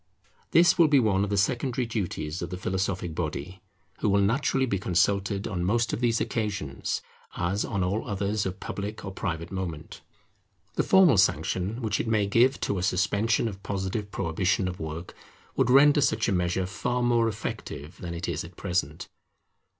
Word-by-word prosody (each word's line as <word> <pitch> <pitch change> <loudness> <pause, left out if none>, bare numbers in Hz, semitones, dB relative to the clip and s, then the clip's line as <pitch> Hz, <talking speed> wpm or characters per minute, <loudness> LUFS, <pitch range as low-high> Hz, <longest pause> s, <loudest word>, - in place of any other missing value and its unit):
This 175 +1 +5
will 165 - +7
be 145 -2 +5
one 100 -5 +2
of 100 - -2
the 100 - 0
secondary 125 +4 0
duties 90 -7 -3
of - - -4
the 90 - -5
philosophic 95 -2 -2
body, 80 +3 -4 0.4
who 105 - +1
will 100 0 +3
naturally 130 +6 +2
be 100 -6 -1
consulted 100 +3 +1
on 90 -4 -2
most 115 +5 +1
of - - -1
these 115 -2 +2
occasions, 100 - -2 0.3
as 95 +4 0
on 100 -4 -1
all 100 +5 -1
others 100 +1 -1
of 95 +1 -6
public 105 +2 -5
or 95 - -5
private 85 -3 -4
moment. 85 -5 -5 0.7
The - - +1
formal 180 - +5
sanction 95 +4 +1
which 105 -1 0
it - - -2
may 110 -2 +2
give 120 +6 +3
to 100 - -1
a - - -3
suspension 100 +5 +1
or 110 - -3
positive 100 +2 -3
prohibition 90 +1 0
of 90 -1 -5
work 80 +2 -6 0.4
would - - +2
render 145 +3 +6
such - - +2
a - - +1
measure 90 0 0
far 125 +6 -2
more 120 -1 +3
effective 95 -6 -5
than 85 -1 -5
it 85 +1 -4
is 85 -2 -2
at 85 +1 -12
present. 85 -5 -2
100 Hz, 180 wpm, -27 LUFS, 90-115 Hz, 0.7 s, will